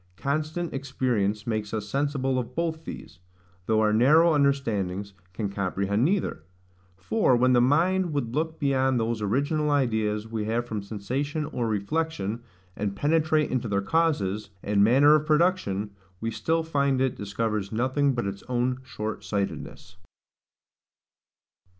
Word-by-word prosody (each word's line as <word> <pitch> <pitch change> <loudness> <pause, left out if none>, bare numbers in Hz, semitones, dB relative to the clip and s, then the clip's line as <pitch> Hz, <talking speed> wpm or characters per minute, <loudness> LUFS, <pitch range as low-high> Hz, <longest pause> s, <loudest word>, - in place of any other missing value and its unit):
Constant 155 +4 -2
experience 125 -7 -1
makes 110 -2 -2
us 105 -1 -4
sensible 135 +1 0
of 120 - -6
both 165 -1 -2
these, - - -9 0.5
though 110 -1 +3
our 105 -1 +3
narrow 155 +9 +5
understandings 105 -9 0 0.2
can 100 +3 -3
comprehend 100 +2 -1
neither. 180 - 0 0.6
For, 130 - +2
when 125 +1 +3
the 120 - +5
mind 170 +7 +2
would 125 -6 -2
look 160 +2 -2
beyond 130 -3 +2
those 115 -1 -1
original 145 - 0
ideas 110 -6 0
we 110 -2 -3
have 115 +2 -1
from 110 -3 -4
sensation 130 +10 -3
or 120 -5 -2
reflection, 110 0 -2 0.3
and 100 -1 -3
penetrate 155 +2 +2
into 125 -2 -1
their 100 -2 0
causes, 105 - 0
and 100 0 +3
manner 135 +7 +6
of 155 0 +2
production, 150 - +1 0.3
we 115 0 -2
find - - -8 0.6
still 130 - +3
it 130 - -2
discovers 105 0 -2
nothing 130 +4 +1
but 120 - -1
its 100 0 -4
own 125 +1 0
short 110 -4 -5
sightedness. 100 -3 -4
120 Hz, 140 wpm, -26 LUFS, 105-145 Hz, 0.6 s, manner